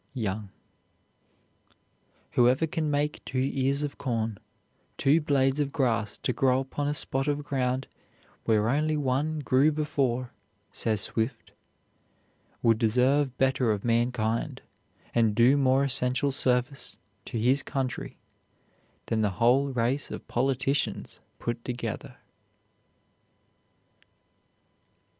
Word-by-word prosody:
YOUNG. 105 -3 -3 1.8
"Whoever 125 +5 +3
can 160 -1 -2
make 145 +1 -1
two 130 +1 -1
ears 140 +1 +1
of 145 - -5
corn, 115 -5 -2 0.6
two 150 +4 +3
blades 135 -1 +2
of 140 -1 0
grass 115 -8 0
to 125 - -2
grow 130 0 +2
upon 145 +2 -3
a 145 - 0
spot 135 -1 0
of 145 0 -1
ground 130 -2 -1 0.6
where 110 -1 +2
only 150 +5 +1
one 145 +3 -1
grew 140 +2 +3
before," 135 -5 -1 0.4
says 110 -2 0
Swift, 115 +2 -2 1.1
"would 115 -2 +4
deserve 125 +4 +2
better 130 -3 +2
of 105 0 -3
mankind 115 -1 0 0.5
and 115 -3 +2
do 120 +4 +5
more 135 -1 +3
essential 130 +1 +1
service 130 +1 0 0.3
to - - -5
his 125 +5 +3
country 130 -4 -4 0.9
than 110 -1 0
the 105 - +2
whole 130 +5 +3
race 125 +2 0
of - - -8
politicians 135 +2 -1 0.2
put 120 0 -4
together." 120 -3 -5
130 Hz, 110 wpm, -27 LUFS, 120-140 Hz, 1.8 s, do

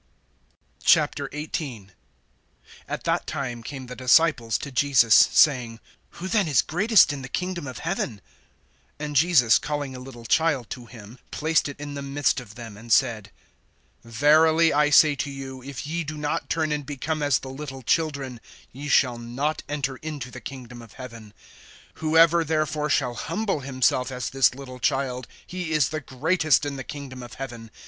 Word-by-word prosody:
XVIII. 145 - 0 1.0
AT - - -5
that - - 0
time 125 -4 -4
came 130 +2 -7
the 125 0 -8
disciples 130 -2 +3
to 140 - -7
Jesus, 125 -4 +4
saying: 120 -6 +5 0.4
Who 185 - -5
then 200 -2 +1
is 140 -6 +3
greatest 200 0 +4
in 140 - -6
the 130 - -8
kingdom 180 -3 -3
of 130 -3 -7
heaven? 155 - -3 0.8
(2)And 150 0 -4
Jesus, 145 -6 +5
calling 145 -3 -4
a - - -7
little 125 -2 -11
child 145 -3 +1
to 125 -3 -7
him, 115 +1 -13
placed 155 -1 +1
it 140 - -9
in 145 0 -6
the 140 - -5
midst 140 0 0
of 105 -5 -12
them, 115 -3 -9
(3)and 115 +2 -10
said: 110 -6 +2 0.7
Verily 155 +7 +4
I 150 0 +3
say 150 +1 +6
to 145 - -2
you, 135 -1 -8
if 135 +1 -7
ye 170 +3 -2
do 155 0 -6
not 150 0 -2
turn 160 -2 0
and 150 -1 -1
become 150 +3 -3
as 145 -4 +3
the 130 - -8
little 135 -1 -8
children, 140 -5 -1 0.3
ye 140 +3 -8
shall 125 -4 +3
not 130 +6 -2
enter 135 -2 -2
into 145 -5 -6
the 125 - -9
kingdom 125 -3 -9
of 115 -3 -14
heaven. 115 -5 -10 0.7
(4)Whoever 165 +1 +4
therefore 155 -1 -1
shall 125 -4 +1
humble 195 - -2
himself 130 -1 0
as 125 -1 -4
this 135 -1 +3
little 130 -2 -9
child, 130 -1 -1 0.2
he 180 -2 -5
is 150 -5 +3
the 155 0 -4
greatest 155 +4 +1
in 145 -1 -3
the 135 - -6
kingdom 135 -2 -8
of 120 -1 -10
heaven. 120 -4 -7
140 Hz, 170 wpm, -25 LUFS, 125-150 Hz, 1.0 s, say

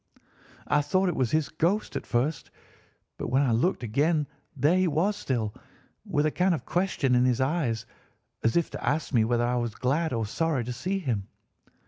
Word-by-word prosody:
I 145 +2 +2
thought 185 +5 +1
it 175 - -2
was 130 -3 +1
his 155 +1 +1
ghost 175 +7 0
at - - -4
first; 135 +6 -1 0.7
but - - -3
when 135 +2 +2
I 130 - +2
looked 125 +7 +1
again 150 +7 +1 0.3
there 145 +7 +3
he 185 0 +3
was 170 +7 +1
still, 115 - -2 0.5
with 145 +1 +1
a 155 - +2
kind 180 +1 +2
of - - -8
question 175 -8 0
in 125 0 +4
his 125 -1 +2
eyes, 130 -5 0 0.6
as 115 +7 +2
if 170 - 0
to - - -7
ask 150 0 -1
me 115 -3 +4
whether 120 +1 +1
I 125 +1 0
were 120 -1 0
glad 140 +9 0
or 115 -3 -1
sorry 150 +3 0
to 125 +2 -4
see 185 +10 -2
him. 120 - -2
145 Hz, 195 wpm, -27 LUFS, 120-170 Hz, 0.7 s, in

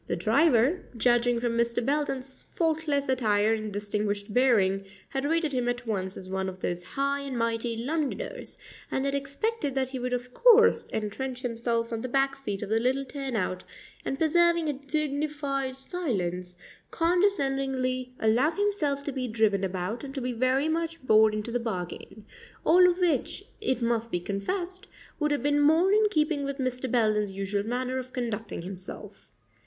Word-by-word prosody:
The - - -1
driver, 255 - +3 0.2
judging 240 0 +3
from 235 -1 -1
Mr. 235 0 0
Belden's 270 -2 -2
faultless 315 -4 +1
attire 220 -4 +2
and 215 -1 -3
distinguished 205 0 -2
bearing, 205 -6 +3 0.3
had 270 0 -2
rated 320 -1 +1
him 250 -2 0
at 245 0 -3
once 190 -4 -2
as 185 - -9
one 190 0 -2
of 185 - -9
those 175 -1 -3
high 275 +8 -1
and 275 -3 -4
mighty 230 0 -1
Londoners, 305 - -3 0.3
and 265 - -1
had 275 - 0
expected 280 - -2
that 260 -1 0
he 260 -1 -5
would 250 0 -3
of 250 0 -3
course 465 -1 +5
entrench 250 +5 -4
himself 230 -1 -1
on 225 - -2
the 255 - -4
back 270 +1 +2
seat 210 -8 -4
of - - -6
the 220 +1 +2
little 260 +3 0
turnout 245 -10 -3 0.4
and, 270 - -2
preserving 340 +1 +3
a 295 - +1
dignified 285 -1 -2
silence, 185 - -2 0.3
condescendingly 270 -8 +1
allow 230 +7 +3
himself 335 -8 0
to 285 - -3
be 260 -2 -3
driven 215 -3 +1
about 190 +4 -3
and 275 0 -7
to 270 - -2
be 250 0 -2
very 255 +5 +2
much 330 +1 -1
bored 215 -2 +5
into 215 +2 -4
the 245 - 0
bargain 210 -1 -5 0.4
all 360 +2 +7
of 350 - 0
which, 355 +2 0 0.2
it 260 - 0
must 230 -1 0
be 175 - 0
confessed, 350 - -3 0.3
would 300 -1 +1
have 290 -2 0
been 290 0 +2
more 320 +6 +4
in 425 +1 +5
keeping 305 -5 +1
with 280 0 -3
Mr. 255 -1 -2
Belden's 215 -4 +2
usual 200 +1 -2
manner 255 +1 -1
of 255 0 -8
conducting 225 -7 -4
himself. 190 +2 -9
255 Hz, 170 wpm, -28 LUFS, 220-290 Hz, 0.4 s, all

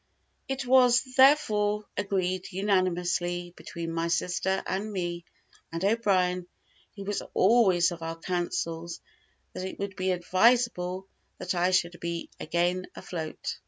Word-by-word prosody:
It 270 -1 -3
was, 250 -1 +5
therefore, 210 -7 +4
agreed 185 -2 -1
unanimously 180 -2 0
between 165 -1 -6
my 165 0 -1
sister, 180 +3 0
and 200 +4 -3
me, 175 -3 -3 0.5
and 165 +3 -2
O'Brien, 185 -5 +1 0.5
who 200 - -7
was 205 +1 -2
always 190 -5 +4
of 170 -1 -7
our 165 0 -4
councils, 170 -1 -3 0.5
that - - -5
it - - -8
would 200 -1 -4
be 185 0 -1
advisable 185 0 +2 0.3
that 180 - -3
I 180 0 +2
should 175 -2 +1
be 170 0 -4
again 175 +2 0
afloat. 160 -3 -5
185 Hz, 125 wpm, -28 LUFS, 175-205 Hz, 0.5 s, was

